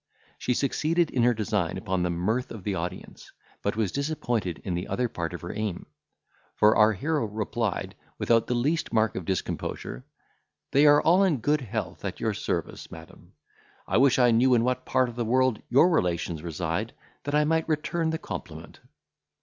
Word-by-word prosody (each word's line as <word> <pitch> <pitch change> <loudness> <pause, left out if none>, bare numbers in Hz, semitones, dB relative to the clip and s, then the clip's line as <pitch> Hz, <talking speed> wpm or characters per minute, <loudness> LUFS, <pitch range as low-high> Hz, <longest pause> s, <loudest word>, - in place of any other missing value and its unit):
She 125 - 0
succeeded 155 +5 +1
in 125 - +1
her 120 +1 +4
design 105 -6 -1
upon 95 -4 -2
the 90 - 0
mirth 105 +9 -1
of 110 -5 -8
the 100 - -1
audience, 90 +1 -6 0.3
but 100 - -1
was 110 -4 0
disappointed 120 - -2
in 90 - -3
the 90 +2 -3
other 125 0 0
part 85 -7 -4
of 85 - -7
her 85 - -6
aim; 105 -4 -3 0.7
for 105 +1 +5
our 110 0 +5
hero 150 - -1
replied, 110 0 -2 0.2
without 115 -1 +2
the 125 - 0
least 150 +7 0
mark 110 -1 +2
of 90 - -4
discomposure, 85 -8 -3 0.7
"They 145 +2 +5
are 145 0 +6
all 180 +4 +5
in 175 -7 +2
good 145 +5 +1
health 110 -5 -5
at - - -4
your - - 0
service, - - -4
madam; 80 0 -13 0.5
I - - +1
wish 135 +1 +5
I 125 -2 +5
knew 125 +3 +4
in 115 - +3
what 125 +1 -1
part 130 - +2
of 120 - -8
the 120 - -1
world 130 0 +2
your 135 +8 +6
relations 85 - 0
reside, 85 +6 -3 0.3
that 145 0 -1
I 150 - +4
might 160 +1 +1
return 160 +2 0
the 160 - -1
compliment." - - -8
115 Hz, 185 wpm, -27 LUFS, 95-140 Hz, 0.7 s, are